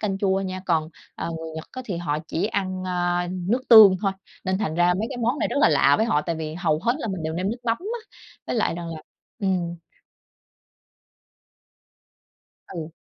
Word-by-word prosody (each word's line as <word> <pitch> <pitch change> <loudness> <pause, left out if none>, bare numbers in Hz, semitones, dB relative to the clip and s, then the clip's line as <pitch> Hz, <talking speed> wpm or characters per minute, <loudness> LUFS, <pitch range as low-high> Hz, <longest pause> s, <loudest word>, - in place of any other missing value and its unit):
canh 195 -2 -1
chua 195 -1 +1
nha. 185 -1 -4
Còn, 155 -1 +1 0.3
à, - - -4
người 160 0 -7
Nhật 160 - -5
á, 255 - -6
thì 190 -7 -4
họ 150 -3 -1
chỉ 185 +6 0
ăn, 185 -4 -2
a, 175 -1 0
nước 185 +7 -1
tương 210 -5 +10
thôi. 195 -2 +1 0.3
Nên 190 0 0
thành 180 -7 -2
ra 175 +1 +3
mấy 215 +4 -1
cái 260 - -5
món 240 +5 0
này - - 0
rất - - -3
là - - +6
lạ 145 -2 +4
với 220 - +1
họ, 150 -10 +2
tại 170 0 -2
vì 155 -1 -5
hầu 165 -3 +1
hết 235 - +3
là 230 - -4
mình 190 -4 -4
đều 160 0 -2
nêm 185 +3 -1
nước 235 - -4
mắm 230 -1 +1
á. 450 +6 -5 0.5
Với - - -2
lại 215 - +1
rằng 170 -1 -6
là, 155 - -9 0.4
ừm 180 -4 -1 2.9
Ừ. 165 -3 -6
185 Hz, 205 wpm, -24 LUFS, 170-210 Hz, 2.9 s, tương